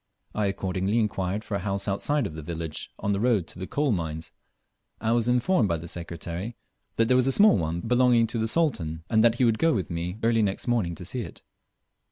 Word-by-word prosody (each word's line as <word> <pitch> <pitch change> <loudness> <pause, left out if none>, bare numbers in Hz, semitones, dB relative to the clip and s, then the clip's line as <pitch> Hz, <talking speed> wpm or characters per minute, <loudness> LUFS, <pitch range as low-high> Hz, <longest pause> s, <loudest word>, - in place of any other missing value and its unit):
I 105 -2 0
accordingly 95 +2 -1
inquired 105 -2 -1
for 110 - -7
a 100 - 0
house 100 0 -2
outside 135 +8 0
of 80 - -5
the 80 - -7
village 80 0 -5
on 100 - -1
the 100 - -1
road 110 -6 +2
to - - -10
the 95 - -5
coal 145 -2 0
mines, 80 -4 -3 0.7
and 110 +1 +1
was 120 -1 +1
informed 125 - +2
by 85 - +1
the 85 +2 -8
Secretary 85 +5 -5 0.4
that 115 - +2
there 125 - +4
was 130 0 +3
a - - +3
small 205 - +6
one 85 -2 -1
belonging 125 0 +4
to 115 +1 -3
the 110 - 0
Sultan, 95 - 0
and 110 -1 +4
that 120 -1 +5
he 125 - +2
would 115 -2 +2
go 165 0 +3
with 95 -5 -3
me 85 +3 -3
early 115 0 +3
next 100 +2 -1
morning 110 -9 0
to 90 - -9
see 125 +8 -2
it. - - -9
105 Hz, 230 wpm, -26 LUFS, 85-120 Hz, 0.7 s, small